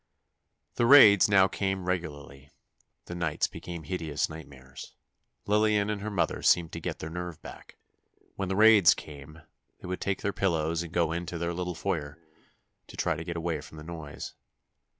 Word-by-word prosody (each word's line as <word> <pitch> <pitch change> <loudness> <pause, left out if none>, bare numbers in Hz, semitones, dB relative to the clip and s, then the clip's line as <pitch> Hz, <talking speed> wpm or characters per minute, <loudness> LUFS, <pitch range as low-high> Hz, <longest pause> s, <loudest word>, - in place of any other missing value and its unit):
The 120 - +2
raids 105 -8 +8
now 95 -2 +5
came 95 -1 -3
regularly. 75 -6 -5 0.6
The - - -8
nights 85 -3 -1
became 85 -2 -8
hideous 80 -5 -3
nightmares. 65 -4 -11 0.5
Lillian 105 0 +2
and 105 -1 -4
her 105 - -4
mother 100 -5 -1
seemed 85 -2 +3
to 85 - -6
get - - -5
their 80 - -7
nerve 90 -1 -6
back. - - -12 0.6
When 95 -2 -3
the 95 - -1
raids 105 -3 +6
came, 75 +2 -12 0.4
they - - -10
would 90 0 -4
take 100 0 -2
their 100 - -1
pillows 85 -3 0
and 85 -2 -7
go 85 -2 +1
into 85 +1 -4
their 85 +1 -2
little 90 0 -4
foyer, 80 -5 -3 0.7
to - - -13
try - - 0
to 80 - -6
get 85 0 -5
away 80 -2 -2
from 75 +1 -13
the 75 - -9
noise. 80 -3 -8
85 Hz, 170 wpm, -28 LUFS, 80-95 Hz, 0.7 s, raids